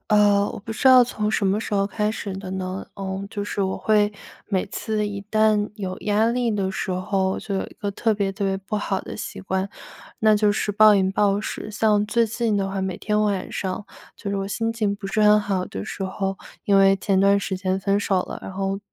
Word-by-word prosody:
呃， 205 -1 +4
我 - - -7
不 220 +2 -7
知 220 - -5
道 255 -1 +9
从 215 -3 -1
什 205 -2 +1
么 195 +2 +2
时 220 - -5
候 195 -1 +2
开 210 +1 -1
始 205 -3 -5
的 190 -1 -6
呢， 190 0 -4
嗯， 195 0 -4
就 205 - -3
是 205 -1 -2
我 190 0 -1
会 210 -1 +2 0.3
每 190 -3 0
次 215 -1 -2
一 200 -1 -5
旦 215 -1 +3
有 190 -3 -4
压 210 +2 +2
力 240 0 +1
的 200 -3 -1
时 190 - -3
候， 190 +1 0
就 200 - -5
有 190 - 0
一 - - -14
个 205 -1 -1
特 220 +3 +1
别 200 -2 0
特 195 +1 -4
别 195 0 0
不 195 +2 -4
好 195 -2 -1
的 - - -8
习 - - -6
惯， 190 +1 -2 0.5
那 215 -1 +4
就 205 -1 +3
是 210 - -1
暴 210 +1 +6
饮 190 -1 +2
暴 200 0 +2
食。 215 - -5
像 210 -1 +2
最 230 +2 +2
近 225 -1 0
的 195 -1 -1
话， 195 0 -3
每 190 -2 -3
天 210 0 0
晚 200 -3 -1
上， 190 +2 -4 0.3
就 200 - -5
是 200 - -1
我 195 0 -2
心 225 +3 -1
情 210 -3 0
不 200 -1 -7
是 215 +2 0
很 210 0 +6
好 195 -3 -1
的 95 - -6
时 - - -6
候， 195 0 -3 0.3
因 200 - +3
为 195 0 +6
前 195 0 +1
段 200 +1 +4
时 190 -1 -3
间 185 0 -1
分 200 +1 +1
手 195 -2 +1
了， - - -7
然 - - -7
后 195 +1 -2
200 Hz, 255 characters per minute, -23 LUFS, 195-210 Hz, 0.5 s, 道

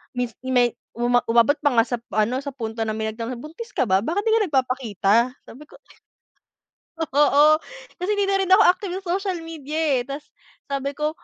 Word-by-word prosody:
mins 245 -1 -2
may 245 -2 +3 0.2
uma 240 +1 +2
umabot 235 +5 +3
pa 290 -3 +1
nga 230 - +5
sa 245 0 -3
p 235 - -23
sa 215 - 0
ano 240 +5 0
sa 280 0 -5
punto 225 -3 -6
na 220 - -2
may 220 0 -2
nagtanong 230 +3 -5
sabi 240 - -8
niya, - - -9
buntis 460 +9 -9
ka - - +1
ba 190 -6 +3
bakit 335 - -2
'di 445 - +1
ka 450 0 +4
nagpapakita? 255 - 0 0.3
Sabi 285 +6 -13
ko - - -17 1.4
oo 295 +1 +5 0.4
kasi 360 +3 -2
hindi 405 -1 +1
na 390 - +2
rin 380 -1 -1
ako 420 - +6
active 365 -1 +2
sa 365 0 -1
social 375 -4 -4
media 310 -3 -8 0.2
eh 245 - -4
tas 280 +1 -6 0.5
sabi 275 0 -2
ko 300 +1 -1
275 Hz, 215 wpm, -23 LUFS, 235-330 Hz, 1.4 s, ako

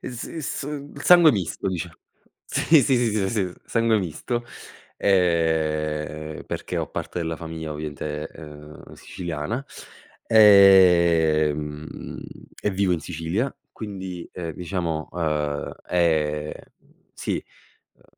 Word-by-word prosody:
Es 125 -1 -6
s 160 -5 -4
il 145 -1 -7
sangue 175 -3 +7
misto 95 -2 -2
dicia 90 -3 -4 0.5
sì, 160 -4 +4
sì, 135 -1 +3
sì, 115 -3 +1 0.2
sì, 100 -5 -1
s - - -13
sangue 115 -1 +2
misto, 105 - -3 0.5
ehm, 80 -4 0
perché - - -5
ho - - -1
parte - - -4
della 80 -1 -2
famiglia 80 -1 -6
ovviamente, 75 0 -5
uhm, 75 -1 -12
siciliana, 85 - -5 0.6
ehm, 85 -7 +4 0.4
e 105 - +1
vivo 95 -1 +1
in 85 - 0
Sicilia 90 - -3 0.2
quindi, 95 -5 -7
ehm, 85 -3 -5
diciamo, 85 -2 -3
uhm, 75 -4 -2
è 75 -3 +1 0.6
sì, - - -3 0.5
uhm, - - -29
85 Hz, 110 wpm, -24 LUFS, 75-100 Hz, 0.6 s, sangue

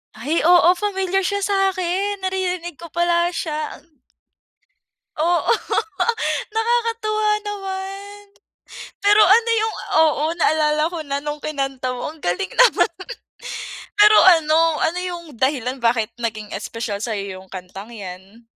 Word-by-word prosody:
Ay 285 +10 -1
oo, 350 0 +6
familiar 385 -2 -1
siya 405 0 -1
sa'kin, 390 0 0
naririnig 365 -3 -3
ko 340 - -9
pala 345 +1 +1
siya 305 -2 -3
ang 310 -5 -22 1.2
Oo 340 +3 +1 1.0
nakakatuwa 450 -1 0 0.2
naman. 390 0 -6 0.8
Pero 415 +1 +5
ano 455 +4 +5
'yung 440 0 -1 0.3
oo 300 -1 +1
naalala 305 -2 +2
ko 340 - -5
na 280 0 -2
nung 295 0 -4
kinanta 270 -4 -3
mo, 245 - -5
ang 315 - -17
galing 175 - -2
naman. - - +4 1.1
Pero 420 +1 +7 0.2
ano 310 0 +1 0.2
ano 340 +3 0
'yung 350 -2 -5
dahilan 260 0 0
bakit 230 -1 +1
naging 215 -3 -4
espesyal 210 +1 -4
sa'yo 200 -4 -4
'yung 190 - -16
kantang 190 +4 -9
'yan? 195 +2 -10
335 Hz, 125 wpm, -21 LUFS, 250-390 Hz, 1.2 s, Pero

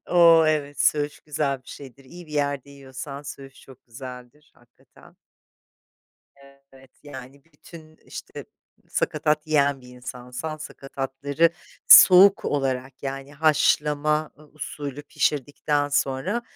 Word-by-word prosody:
O, 170 -2 +6
evet 145 -2 -1
söğüş 145 -1 +1
güzel 145 -3 -3
bir - - -19
şeydir, 135 -1 -12
iyi 175 +6 -13
bir 150 - -14
yerde 140 -2 -2
yiyorsan 140 +1 -9
söğüş 135 -2 -11
çok 130 -1 -18
güzeldir 125 +4 -12
hakikaten. 120 -1 -23 1.6
Evet, 130 -1 -18
yani 135 -1 -12
bütün, 155 0 -16
işte, - - -10 0.4
sakatat 150 +1 -1
yiyen 145 -3 +1
bir 125 - -16
insansan 125 +4 -7
sakatatları 140 +2 -2 0.4
soğuk 195 +2 +8
olarak 135 -2 -3
yani 135 +1 -6
haşlama 150 0 +1 0.2
usulü 145 -2 -7
pişirdikten 145 0 -1
sonra, 145 - -1
145 Hz, 110 wpm, -24 LUFS, 135-150 Hz, 1.6 s, soğuk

